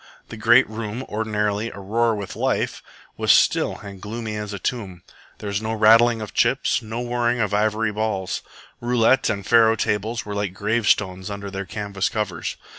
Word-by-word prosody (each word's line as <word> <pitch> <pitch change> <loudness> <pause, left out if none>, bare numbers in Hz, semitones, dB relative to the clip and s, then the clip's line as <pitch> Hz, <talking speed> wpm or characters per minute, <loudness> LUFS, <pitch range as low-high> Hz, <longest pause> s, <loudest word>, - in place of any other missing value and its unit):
The - - -7
great 120 +4 +5
room, 110 +2 -5
ordinarily 105 -1 -1
aroar 110 +4 0
with 100 -2 -6
life, - - -1 0.4
was - - +3
still - - +3
and 100 -2 -10
gloomy 110 0 -5
as 105 -1 -5
a 100 - -4
tomb. 95 -4 -4 0.3
There - - -10
was 100 +1 -1
no 110 0 -2
rattling 115 +1 +5
of 105 - -9
chips, - - +2
no 110 +2 -5
whirring 120 0 0
of 105 -2 0
ivory 110 +1 +1
balls. 105 -3 -2 0.4
Roulette 120 +1 +3
and 100 -3 -2
faro 115 0 +5
tables 110 +2 -1
were 105 - -5
like 100 -2 -3
gravestones 105 -3 0
under 100 -1 -6
their 100 0 -4
canvas 100 -1 -2
covers. 100 -6 -3
105 Hz, 170 wpm, -22 LUFS, 100-115 Hz, 0.4 s, great